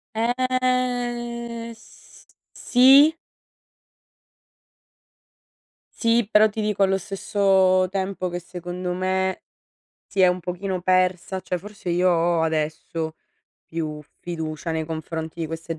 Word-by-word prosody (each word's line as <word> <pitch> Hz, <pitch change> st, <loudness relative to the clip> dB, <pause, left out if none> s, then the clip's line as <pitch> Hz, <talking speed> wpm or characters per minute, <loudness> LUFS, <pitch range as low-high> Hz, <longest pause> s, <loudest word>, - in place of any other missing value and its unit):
Ehm, 240 Hz, -1 st, -1 dB
s -, -, -19 dB, 0.3 s
sì? 270 Hz, +5 st, +6 dB, 2.9 s
Sì, 230 Hz, -2 st, +2 dB
però 215 Hz, +1 st, +6 dB
ti 215 Hz, +1 st, -5 dB
dico 210 Hz, -2 st, +1 dB
allo 195 Hz, 0 st, +2 dB
stesso 190 Hz, -1 st, +2 dB
tempo 190 Hz, -1 st, -2 dB
che 175 Hz, -, -4 dB
secondo 180 Hz, 0 st, -5 dB
me 190 Hz, +1 st, -1 dB, 0.7 s
si 195 Hz, -, 0 dB
è 185 Hz, -, +7 dB
un 180 Hz, 0 st, +1 dB
pochino 180 Hz, +1 st, -4 dB
persa 185 Hz, 0 st, +1 dB
cioè 180 Hz, -, -3 dB
forse 200 Hz, 0 st, -8 dB
io 180 Hz, +2 st, +3 dB
ho 170 Hz, -1 st, +2 dB
adesso 160 Hz, 0 st, -2 dB, 0.5 s
più 155 Hz, -2 st, -5 dB, 0.2 s
fiducia 160 Hz, -1 st, -5 dB
nei 160 Hz, -1 st, -1 dB
confronti 160 Hz, +1 st, -5 dB
di 165 Hz, -, -1 dB
queste 165 Hz, 0 st, -6 dB
185 Hz, 110 wpm, -23 LUFS, 170-220 Hz, 2.9 s, è